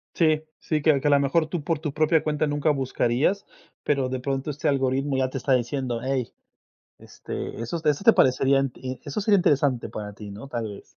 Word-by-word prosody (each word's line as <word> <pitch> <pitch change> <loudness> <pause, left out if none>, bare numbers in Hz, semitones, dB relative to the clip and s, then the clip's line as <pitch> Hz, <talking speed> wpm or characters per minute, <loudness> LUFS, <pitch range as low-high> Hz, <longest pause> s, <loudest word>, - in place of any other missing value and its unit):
Sí, 155 -2 +2 0.2
sí, 155 -2 -1
que 145 -2 +4
que 140 - -1
a - - +4
lo 140 - +5
mejor 145 +4 +1
tú 165 -1 -4
por 160 0 -1
tu 150 -3 -4
propia 155 +1 +2
cuenta 155 0 0
nunca 145 +1 +1
buscarías, 135 +6 0 0.4
pero 135 -3 0
de 130 0 -3
pronto 135 +2 -3
este 145 -1 -3
algoritmo 135 0 +1
ya 130 -1 +1
te 130 - -5
está 135 +1 +1
diciendo: 125 -1 -1
"Ey, 130 -2 -2 0.7
este, - - -7
esos, 160 +8 -4
esto 150 +4 +1
te 230 - +8
parecería, 135 -1 +3 0.4
eso 145 +7 -3
sería 210 0 +4
interesante 145 -8 +2
para 105 -1 -6
ti, 105 0 -9
¿no?, 105 +7 -9
tal 115 -4 -3
vez". 100 - -10
140 Hz, 200 wpm, -25 LUFS, 130-155 Hz, 0.7 s, te